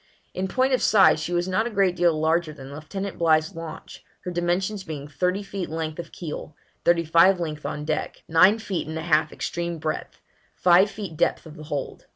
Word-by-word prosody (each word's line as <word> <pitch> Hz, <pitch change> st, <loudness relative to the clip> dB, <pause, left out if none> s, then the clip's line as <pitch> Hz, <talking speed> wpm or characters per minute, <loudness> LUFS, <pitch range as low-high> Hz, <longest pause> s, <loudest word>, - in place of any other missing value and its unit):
In 190 Hz, +1 st, -2 dB
point 260 Hz, +6 st, +1 dB
of 255 Hz, -, +2 dB
size 195 Hz, -6 st, +5 dB
she 155 Hz, -, -4 dB
was 175 Hz, +1 st, 0 dB
not 190 Hz, +5 st, +1 dB
a -, -, -3 dB
great 195 Hz, -4 st, +2 dB
deal 170 Hz, -3 st, +2 dB
larger 160 Hz, +1 st, +1 dB
than 135 Hz, -1 st, -10 dB
Lieutenant 195 Hz, +6 st, -6 dB
Bligh's 160 Hz, -2 st, +3 dB
launch, 165 Hz, -1 st, -9 dB, 0.2 s
her 180 Hz, -, -5 dB
dimensions 180 Hz, +4 st, -1 dB
being 150 Hz, -5 st, -6 dB
thirty 180 Hz, +7 st, -1 dB
feet 195 Hz, -3 st, -5 dB
length 160 Hz, 0 st, -4 dB
of 170 Hz, -, -7 dB
keel; 155 Hz, -2 st, -7 dB, 0.3 s
thirty 170 Hz, -1 st, +3 dB
five 170 Hz, +4 st, +5 dB
feet 175 Hz, -, -3 dB
length 150 Hz, -2 st, -5 dB
on 150 Hz, 0 st, -5 dB
deck; 155 Hz, -1 st, -3 dB
nine 175 Hz, +6 st, +5 dB
feet 200 Hz, -7 st, -4 dB
and 160 Hz, +1 st, -5 dB
a 160 Hz, -, -4 dB
half 155 Hz, -2 st, +2 dB
extreme 170 Hz, 0 st, -3 dB
breadth; 155 Hz, 0 st, -4 dB, 0.4 s
five 180 Hz, +3 st, +5 dB
feet 200 Hz, -6 st, -7 dB
depth -, -, +1 dB
of 160 Hz, -1 st, -11 dB
the 155 Hz, -2 st, -10 dB
hold. 145 Hz, -3 st, -5 dB
170 Hz, 205 wpm, -24 LUFS, 155-190 Hz, 0.4 s, size